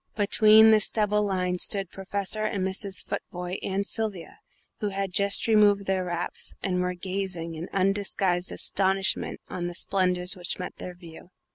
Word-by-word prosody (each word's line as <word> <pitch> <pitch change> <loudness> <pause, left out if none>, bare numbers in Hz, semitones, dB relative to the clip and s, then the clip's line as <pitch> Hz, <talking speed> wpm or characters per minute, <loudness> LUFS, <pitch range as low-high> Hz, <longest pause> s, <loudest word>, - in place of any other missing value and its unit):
Between 215 +1 +6
this 215 -2 +5
double 210 -1 +1
line 185 -3 -1
stood 195 -1 +2
Professor 200 +2 -2
and 200 -3 -1
Mrs. 190 +1 -2
Futvoye 180 0 -5
and 195 +1 -2
Sylvia, 210 - -3 0.4
who 210 - -1
had 195 -1 -3
just 200 +1 +2
removed 205 -2 +4
their 190 -1 -1
wraps 175 0 -4
and 180 -2 0
were 180 0 -2
gazing 185 -2 -3
in 160 +2 -7
undisguised 195 -2 0
astonishment 190 0 0
on 175 -1 -4
the 175 - -6
splendours 180 0 0
which 175 -1 -3
met 180 - -6
their 180 - -8
view. 170 -1 -13
190 Hz, 155 wpm, -26 LUFS, 180-200 Hz, 0.4 s, Between